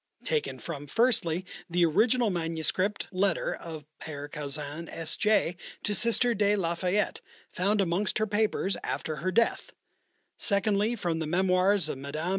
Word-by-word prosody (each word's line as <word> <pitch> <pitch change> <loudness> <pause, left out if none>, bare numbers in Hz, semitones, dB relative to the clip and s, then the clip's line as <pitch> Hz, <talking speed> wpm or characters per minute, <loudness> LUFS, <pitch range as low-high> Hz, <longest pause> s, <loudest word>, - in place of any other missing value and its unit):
Taken 460 -2 -1
from, 145 -4 -7
firstly, 185 - +1 0.2
the 175 0 +3
original 225 +7 +3
manuscript 170 +4 -1
letter 190 -1 +1
of 160 -3 -8 0.2
Père 145 -2 -6
Caussin, 150 +2 -5
S. 160 -1 -3
J., 210 -5 +2 0.3
to 210 - 0
Sister 235 +3 +3
de 205 -1 +3
la 170 -4 0
Fayette, 185 +4 0 0.3
found 200 +3 +1
amongst 190 +2 +1
her 215 - +1
papers 210 -2 +1
after 155 -1 -3
her 185 +6 -1
death; 230 +5 +1 0.7
secondly, 205 +2 +2
from 170 -7 -2
the 160 - -2
memoirs 185 +3 +3
of 135 - -4
Mme. 155 +5 -3
185 Hz, 145 wpm, -28 LUFS, 165-210 Hz, 0.7 s, the